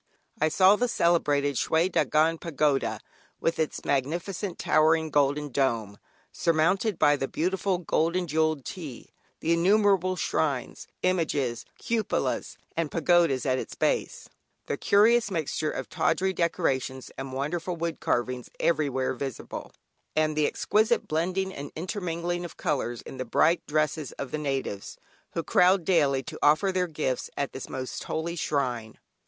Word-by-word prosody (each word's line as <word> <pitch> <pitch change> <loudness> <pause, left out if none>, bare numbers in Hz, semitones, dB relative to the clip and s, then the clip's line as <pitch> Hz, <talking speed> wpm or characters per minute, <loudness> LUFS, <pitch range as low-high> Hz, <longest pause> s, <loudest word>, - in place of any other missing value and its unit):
I 155 - +4
saw 190 +5 +5
the 245 - +1
celebrated 145 - +2
"Schwee 160 +2 +2
Dagon 160 +1 +2
Pagoda" 150 -4 0 0.4
with 165 0 0
its 160 - -2
magnificent 170 +7 -2
towering 160 +1 +3
golden 145 +1 +2
dome, 115 -7 -1 0.3
surmounted 175 +5 +1
by 145 -1 +5
the 135 -1 -2
beautiful 185 +4 0
gold 170 -1 0
and 180 -1 0
jewelled 155 -2 +1
"Htee;" 150 -10 -8 0.3
the 165 - +2
innumerable 190 +1 +3
shrines, 140 -7 -2 0.2
images, 155 -9 0
cupolas, 230 -2 -1 0.2
and 165 -2 -1
pagodas 165 -4 +2
at 130 -1 +1
its - - -6
base, - - -1 0.4
the - - -2
curious 225 +2 +4
mixture 155 -3 -1
of 135 - -4
tawdry 190 0 +1
decorations 135 -7 -1
and 135 0 -6
wonderful 160 +7 -2
wood 165 -3 -3
carvings 125 0 -1
everywhere 140 -6 +1
visible, 130 -1 -6 0.4
and 155 0 +2
the 150 -1 +3
exquisite 220 +3 +1
blending 185 +4 -1
and 140 -3 -7
intermingling 175 -1 -3
of 175 - -8
colours 120 -5 -2
in - - -9
the 130 - -2
bright 155 +7 +2
dresses 155 -1 -1
of 140 - -6
the 155 - -2
natives, 135 -9 -3 0.4
who - - -2
crowd 180 -1 +4
daily 145 -7 +3
to - - -8
offer 155 +7 +4
their 185 -1 0
gifts 150 -6 -2
at 140 - -2
this 130 - -7
most 130 -1 -5
holy 170 +2 -3
shrine. 125 -8 -2
155 Hz, 145 wpm, -27 LUFS, 140-175 Hz, 0.4 s, saw